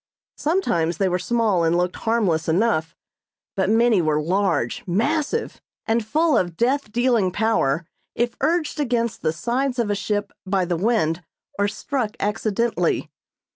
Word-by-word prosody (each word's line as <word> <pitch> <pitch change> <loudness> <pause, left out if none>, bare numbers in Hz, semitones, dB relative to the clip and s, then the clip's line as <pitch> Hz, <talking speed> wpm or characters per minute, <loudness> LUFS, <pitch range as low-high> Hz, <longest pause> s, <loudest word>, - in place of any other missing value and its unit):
Sometimes 175 - 0
they 195 - +2
were 180 0 0
small 210 -2 +1
and 165 +1 +2
looked 180 0 -1
harmless 195 -9 0
enough; 165 -3 +1 0.6
but 190 -1 +1
many 225 -2 +4
were 155 -2 +1
large, 175 -5 0
massive, 295 - -1 0.2
and 225 +1 +1
full 310 +8 +2
of 175 -2 0
death 255 -1 0
dealing 235 -5 +2
power 180 -7 +1 0.3
if 240 0 0
urged 315 +1 0
against 235 -4 -1
the 155 - +1
sides 245 +8 -1
of 230 -4 0
a - - +1
ship 205 0 -2
by 190 -1 0
the 175 0 -1
wind 175 -4 +1 0.4
or 205 - +3
struck 220 +1 -3
accidentally. 220 +2 0
210 Hz, 145 wpm, -22 LUFS, 175-240 Hz, 0.6 s, many